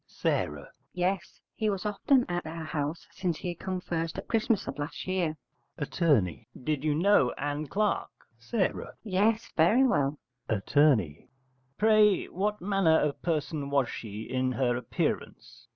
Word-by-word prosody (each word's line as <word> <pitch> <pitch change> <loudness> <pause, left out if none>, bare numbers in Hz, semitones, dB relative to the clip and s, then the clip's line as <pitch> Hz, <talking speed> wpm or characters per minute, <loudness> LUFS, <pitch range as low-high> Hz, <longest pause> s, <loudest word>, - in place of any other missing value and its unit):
S. - - +2 0.4
Yes: 180 +1 -2
he 215 -1 0
was 195 0 -2
often 245 +5 +2
at 175 -2 -3
our 165 +1 -5
house 150 +1 -3
since 175 -4 -2
he 175 - -4
come 185 +2 -4
first 165 -1 -3
at 195 - -6
Christmas 225 -2 +1
of - - -5
last 145 +3 -5
year. 180 -4 -1 0.4
Att. 150 - -5 0.6
Did 150 0 -1
you 150 -1 +1
know 175 -6 +4
Ann 145 +1 -2
Clark? 210 +7 0 0.4
S. 215 -5 +2 0.3
Yes, 220 +3 +1
very 205 +11 +5
well. 145 - +2 0.3
Att. 105 -3 -2 1.0
Pray, 215 -2 +4
what 210 +3 -1
manner 185 -4 +3
of 150 -1 -1
person 155 -3 -2
was 140 -3 +2
she 110 -1 -6
in 130 +2 -1
her 125 -2 +1
appearance? 125 -1 -3
170 Hz, 145 wpm, -29 LUFS, 145-205 Hz, 1.0 s, very